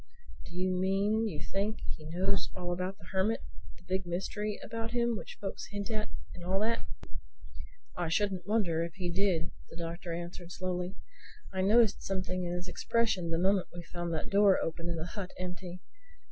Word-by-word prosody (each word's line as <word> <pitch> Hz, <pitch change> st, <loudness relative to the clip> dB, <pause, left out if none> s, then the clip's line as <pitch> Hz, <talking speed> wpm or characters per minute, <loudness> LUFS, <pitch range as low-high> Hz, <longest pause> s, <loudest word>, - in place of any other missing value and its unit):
"Do 175 Hz, -, -8 dB
you 185 Hz, +1 st, +2 dB
mean 195 Hz, +4 st, +3 dB
you 155 Hz, -8 st, -3 dB
think 205 Hz, +3 st, 0 dB, 0.2 s
he 155 Hz, -1 st, -9 dB
knows 180 Hz, +4 st, +1 dB
all 175 Hz, -1 st, -1 dB
about 185 Hz, +2 st, -2 dB
the -, -, -15 dB
Hermit, 195 Hz, +4 st, +2 dB, 0.4 s
the -, -, -19 dB
big 190 Hz, 0 st, 0 dB
mystery 205 Hz, +4 st, -1 dB
about 230 Hz, +1 st, -3 dB
him 235 Hz, -1 st, +3 dB
which -, -, -6 dB
folks 195 Hz, -, -4 dB
hint 205 Hz, +2 st, -3 dB
at 215 Hz, -1 st, -1 dB, 0.2 s
and 175 Hz, -, -8 dB
all 185 Hz, +2 st, +2 dB
that?" 230 Hz, +2 st, +1 dB, 1.1 s
"I 175 Hz, -2 st, 0 dB
shouldn't 190 Hz, 0 st, +1 dB
wonder 185 Hz, -7 st, +3 dB
if 170 Hz, -1 st, -5 dB
he 180 Hz, -2 st, -1 dB
did," 185 Hz, -2 st, +2 dB, 0.2 s
the 165 Hz, -, -10 dB
Doctor 170 Hz, +1 st, -3 dB
answered 175 Hz, +1 st, -5 dB
slowly. 180 Hz, 0 st, -2 dB, 0.6 s
"I 190 Hz, -, +1 dB
noticed 215 Hz, +2 st, +6 dB
something 185 Hz, -1 st, -1 dB
in 175 Hz, -, -1 dB
his 180 Hz, +1 st, -3 dB
expression 195 Hz, -1 st, +2 dB
the 165 Hz, -, +2 dB
moment 190 Hz, +2 st, +4 dB
we 175 Hz, -, -5 dB
found 175 Hz, 0 st, -3 dB
that 155 Hz, -, -3 dB
door 200 Hz, -1 st, +7 dB
open 165 Hz, +1 st, -2 dB
and 170 Hz, -, 0 dB
the 160 Hz, -, -2 dB
hut 185 Hz, 0 st, -5 dB
empty. 180 Hz, 0 st, -4 dB
185 Hz, 185 wpm, -33 LUFS, 175-200 Hz, 1.1 s, door